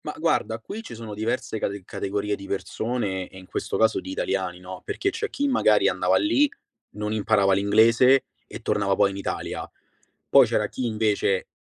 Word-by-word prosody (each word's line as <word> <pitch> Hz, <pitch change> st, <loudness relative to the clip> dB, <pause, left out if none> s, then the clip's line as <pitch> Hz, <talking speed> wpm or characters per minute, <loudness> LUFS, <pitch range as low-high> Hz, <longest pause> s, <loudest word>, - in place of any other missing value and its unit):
Mah, -, -, -5 dB
guarda, 110 Hz, -, 0 dB
qui 205 Hz, -, -7 dB
ci 225 Hz, -, -9 dB
sono 110 Hz, -2 st, -8 dB
diverse 110 Hz, +1 st, -2 dB
cate 100 Hz, -1 st, -3 dB
categorie 100 Hz, +1 st, -2 dB
di 100 Hz, -, -10 dB
persone, 100 Hz, 0 st, -3 dB
e -, -, -14 dB
in 95 Hz, -, -11 dB
questo -, -, -3 dB
caso 110 Hz, 0 st, +3 dB
di -, -, -8 dB
italiani, 95 Hz, -1 st, -2 dB
no, 90 Hz, 0 st, -9 dB
perché 390 Hz, -, -1 dB
c'è 440 Hz, +3 st, -3 dB
chi 285 Hz, -, -1 dB
magari 260 Hz, -3 st, +4 dB
andava -, -, +2 dB
lì, 295 Hz, -2 st, +3 dB, 0.4 s
non 105 Hz, 0 st, -4 dB
imparava 100 Hz, -2 st, +3 dB
l'inglese, 115 Hz, +6 st, +5 dB, 0.2 s
e -, -, -8 dB
tornava 100 Hz, -1 st, +1 dB
poi 100 Hz, 0 st, +3 dB
in 100 Hz, -, -7 dB
Italia. 100 Hz, -, -4 dB, 0.6 s
Poi -, -, +7 dB
c'era -, -, 0 dB
chi 130 Hz, -, -4 dB
invece 105 Hz, -3 st, 0 dB
105 Hz, 180 wpm, -25 LUFS, 100-115 Hz, 0.6 s, Poi